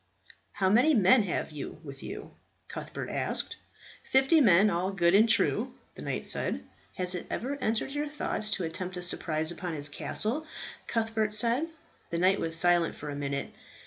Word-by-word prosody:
"How 195 -2 0
many 245 +10 +4
men 220 +3 +5
have 185 -5 -3
you 150 +1 -8
with 135 -2 -10
you?" - - -8 0.4
Cuthbert - - -6
asked. - - -1 0.5
"Fifty 270 +4 +4
men, 200 -4 +6
all 185 +2 -1
good 175 -2 +2
and 220 +3 +5
true," - - +2 0.2
the - - -11
knight - - -4
said. - - -1 0.3
"Has 180 0 +2
it 180 - -6
never 270 +5 -3
entered 230 0 -1
your 295 +1 -2
thoughts 290 -7 -2
to 185 - -4
attempt 180 +3 -4
a 180 - -3
surprise 160 -2 +2
upon 175 0 -5
his 145 -1 0
castle?" 235 - 0 0.4
Cuthbert 220 -2 -1
said. 235 +8 +2 0.4
The 170 - -2
knight 185 +3 +3
was 165 0 +1
silent 175 0 +3
for 150 0 -7
a - - -5
minute. 140 -1 -4
190 Hz, 175 wpm, -28 LUFS, 170-230 Hz, 0.5 s, men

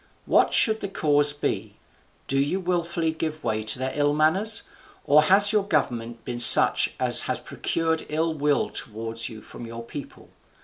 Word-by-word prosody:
What - - +1
should 220 -1 +3
the 200 - -6
cause 145 -6 +1
be? 110 -7 -5 0.5
do 135 - -2
you 145 +7 -2
wilfully 170 -2 -3
give 155 -1 -6
way 110 0 -3
to 110 +1 -1
their 130 +1 -4
ill 145 0 -1
manners? 190 +9 0 0.4
or 150 +2 +4
has 200 +5 +4
your 210 -2 0
government 120 - -4
been 120 -1 -6
such 120 - +7
as - - +3
has - - -1
procured 160 -1 -4
ill 160 +2 -2
will 145 -1 -2
towards 115 +1 -6
you 110 -2 -13
from 120 - -12
your 115 0 -9
people? 140 +4 -12
150 Hz, 170 wpm, -23 LUFS, 120-165 Hz, 0.5 s, such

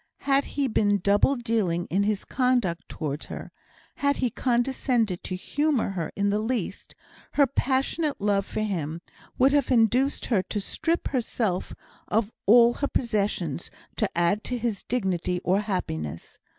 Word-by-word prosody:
Had 275 0 +2
he 280 -1 +2
been 205 -3 +2
double 200 +8 +3
dealing 215 -8 0
in 190 +4 +2
his 210 0 0
conduct 245 -10 0
towards 150 -2 -4
her, - - -7 0.5
had 280 0 +2
he 250 -3 0
condescended 240 -5 0
to 185 - -4
humour 290 +6 0
her 170 -5 -3
in 200 0 +1
the 210 - +1
least, 235 +3 -3 0.4
her 285 - +5
passionate 275 +3 0
love 200 -1 +2
for 215 - -4
him 170 -6 -2 0.4
would 265 +2 +5
have 285 -3 +2
induced 250 +3 +3
her 215 -6 +2
to 190 +3 -4
strip 325 - -1
herself 225 -7 -1 0.3
of 220 +1 0
all 235 +2 +7
her 285 - -2
possessions 200 - -1 0.3
to - - 0
add 175 +5 +2
to 250 - -2
his 230 -4 -2
dignity 185 -6 -1
or 190 +2 +2
happiness. 85 - -4
215 Hz, 150 wpm, -26 LUFS, 190-255 Hz, 0.5 s, all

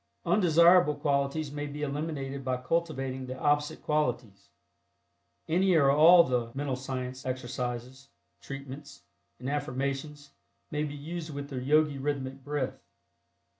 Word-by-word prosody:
Undesirable 170 -3 +5
qualities 140 +1 0
may 145 0 -4
be 145 +1 -6
eliminated 140 -2 -3
by 130 -1 -1
cultivating 135 -3 -2
the 130 +1 -6
opposite 145 0 0
qualities. 120 -10 -2 1.0
Any 185 +2 +3
or 140 -4 +5
all 165 +4 +8
the 125 -5 -1
"Mental 140 -1 -2
Science" 130 0 -5
exercises, 125 +1 -5 0.3
"treatments" 140 +1 -9 0.3
and 130 - -7
"affirmations" 140 +1 -3 0.4
may 150 0 -1
be 145 -1 -6
used 160 +3 -6
with 140 -1 -6
the 130 -2 -3
Yogi 150 +1 +2
Rhythmic 135 -1 -3
Breath. 145 -2 -3
140 Hz, 125 wpm, -29 LUFS, 130-150 Hz, 1.0 s, all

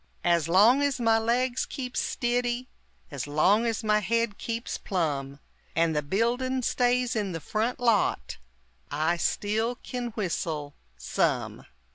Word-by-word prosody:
As 170 -3 +2
long 215 +10 +6
as 285 -2 0
my 225 -1 +3
legs 240 +3 +1
keeps 255 -2 -4
stiddy, 245 0 -1 0.4
And 140 -1 -4
long 190 +10 +3
as 225 0 -2
my 210 -1 +3
head 230 0 0
keeps 230 0 -4
plum, 145 -7 -2 0.4
And 165 -1 +2
the 150 - +2
buildin' 245 - 0
stays 245 0 +1
in 205 -4 -1
the 165 - -3
front 220 - -2
lot, 230 - +1 0.5
I 155 +4 0
still 220 +7 0
kin 245 0 -5
whistle, 160 -7 -3 0.2
some! - - -1
220 Hz, 135 wpm, -27 LUFS, 170-245 Hz, 0.5 s, long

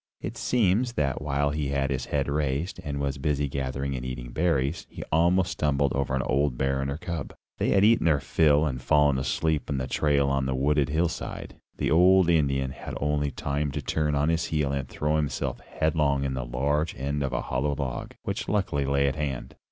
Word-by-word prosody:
It - - -5
seems 120 +1 +1
that 70 - -1
while 70 -1 0
he 75 -1 -2
had 70 0 0
his 65 -2 -2
head 70 -2 -1
raised, 75 +4 -1
and 70 -1 -4
was 70 -1 -2
busy 75 -1 0
gathering 70 0 -3
and 60 - -4
eating 65 -1 -6
berries, 80 0 0
he - - -7
almost 85 +3 +3
stumbled 70 -4 +1
over 70 -1 0
an 65 - 0
old 70 0 +1
bear 65 +1 0
and 70 - -2
her 70 - -3
cub. 85 -3 -5 0.2
They - - +1
had 100 +1 +4
eaten 115 -5 +4
their 75 -3 +4
fill 75 +2 +3
and 65 -4 -3
fallen 70 +1 +3
asleep 75 +3 -1
in 70 - -1
the 65 - -1
trail 70 +1 +1
on 70 -1 0
the 65 - -1
wooded 70 +1 +2
hillside. 80 +3 -2 0.2
The - - 0
old 90 +2 +5
Indian 70 -5 +1
had - - -7
only 75 0 0
time 70 +2 -2
to - - -2
turn 75 -2 0
on 75 +2 +2
his 85 0 +1
heel 75 -3 0
and 70 -2 -3
throw 75 +1 0
himself 75 -3 -2
headlong 75 -3 0
in 70 -1 -1
the 65 -2 -3
large 70 +6 -1
end 70 +3 -2
of 70 -2 -1
a - - -1
hollow 70 +3 -1
log, 70 -3 -4
which - - -3
luckily 90 -9 0
lay 70 0 +2
at 70 - 0
hand. 70 -4 -4
70 Hz, 210 wpm, -27 LUFS, 70-75 Hz, 0.2 s, old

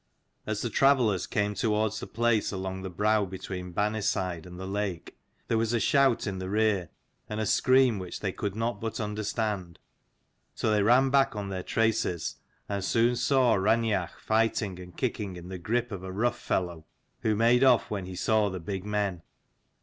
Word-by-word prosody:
As 110 -1 -2
the 120 - -2
travellers 125 -7 +3
came 105 0 0
towards 110 +1 0
the - - -7
place, 120 -2 +1
along 95 -1 -4
the 95 - -5
brow 105 +4 +2
between 90 -1 -6
Banniside 95 -4 -1
and 90 0 -10
the 95 - -5
lake, 95 -3 -3 0.3
there 115 - +1
was 115 +1 0
a 120 - +2
shout 135 +2 +3
in 95 -3 -3
the 95 0 -4
rear, 105 -5 +1 0.4
and 105 0 -3
a 110 - 0
scream, 130 -2 +4
which 90 -1 -6
they 95 - -2
could 100 +1 -4
not 115 +2 -2
but 115 +1 -3
understand. 105 -4 -3 0.8
So 110 - 0
they 105 -1 +3
ran 125 +5 +4
back 135 -3 +3
on 100 -2 -4
their 95 -1 -3
traces, 110 -6 0 0.3
and 100 -1 -3
soon 115 +4 +2
saw 130 -2 +3
Raineach 105 -2 +1
fighting 110 -4 0
and 90 -1 -11
kicking 105 -7 -2
in 90 0 -9
the 95 -1 -6
grip 120 +6 -1
of 100 -3 -5
a 95 0 -6
rough 115 +6 0
fellow, 85 -4 -2 0.3
who 110 -1 +1
made 120 +4 +4
off 125 -3 +4
when 100 -3 -3
he 95 - -7
saw 105 +2 +2
the 95 -1 -5
big 95 +2 -5
men. 100 -4 -1
105 Hz, 185 wpm, -28 LUFS, 95-115 Hz, 0.8 s, scream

